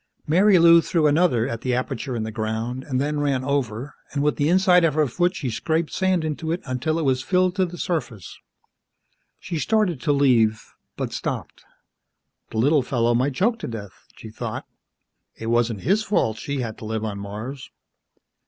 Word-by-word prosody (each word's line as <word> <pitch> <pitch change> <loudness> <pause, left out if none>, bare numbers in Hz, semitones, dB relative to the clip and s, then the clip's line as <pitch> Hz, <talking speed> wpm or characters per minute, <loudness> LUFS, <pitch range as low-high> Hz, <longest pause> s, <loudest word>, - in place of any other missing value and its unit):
Marilou 170 -1 +6
threw 165 -1 0
another 145 -6 +3
at 115 -4 -4
the 125 -1 0
aperture 130 +1 -3
in 110 - -2
the 110 - -4
ground 110 +4 -3
and 130 -2 -2
then 145 +2 -1
ran 140 -3 0
over 135 -1 -2 0.2
and 140 -1 0
with 150 - +1
the 145 +1 +1
inside 180 -1 +5
of 160 -3 +2
her 155 -1 +3
foot 175 +8 0
she 130 -8 -3
scraped 160 +7 -1
sand 185 -3 +1
into 155 +1 -3
it 170 - -1
until 130 +5 -1
it 165 - -1
was 130 -1 +2
filled 180 +4 +1
to 190 -2 +1
the 175 +1 -9
surface. 130 - -4 1.0
She 165 -3 -5
started 200 - +1
to 145 - +1
leave, 120 -6 +3 0.3
but - - -3
stopped. - - -5 0.9
The 115 - -6
little 145 +6 +4
fellow 120 -2 +1
might 130 +3 +1
choke 230 - +1
to - - -5
death, 105 -5 -9
she 110 - -10
thought, - - -5 0.7
it 115 0 -4
wasn't 120 -3 +1
his 200 +4 +2
fault 155 - 0
she 140 +2 -3
had 115 -3 -5
to - - -8
live 110 0 -3
on 100 -2 -4
Mars. 110 +7 -7
140 Hz, 185 wpm, -23 LUFS, 115-165 Hz, 1.0 s, Marilou